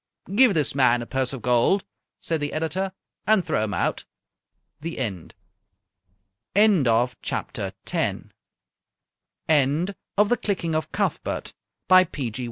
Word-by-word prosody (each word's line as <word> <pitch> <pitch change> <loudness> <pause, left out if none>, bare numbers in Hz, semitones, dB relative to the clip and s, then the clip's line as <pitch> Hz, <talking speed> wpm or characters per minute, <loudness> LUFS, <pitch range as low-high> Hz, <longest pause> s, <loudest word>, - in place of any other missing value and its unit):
"Give 240 -1 +5
this 150 -3 +1
man 125 -3 +3
a - - -7
purse 130 +1 -1
of 135 -4 -7
gold," 125 +11 +3 0.4
said 165 -1 -2
the 145 - -2
editor, 165 +5 -2 0.4
"and 215 -4 +4
throw 110 - 0
him 105 -1 -2
out." - - -1 0.8
THE 165 +2 -6
END 100 -10 -4 1.2
End 200 - +5
of 120 +2 +1
Project - - -4
Gutenberg's - - -2 1.2
The 175 - +1
Clicking 175 -5 -1
of 155 -1 -2
Cuthbert, - - -2 0.3
by 185 0 +7
P. 140 -9 -4
G. 115 - -6
155 Hz, 130 wpm, -24 LUFS, 125-190 Hz, 1.2 s, by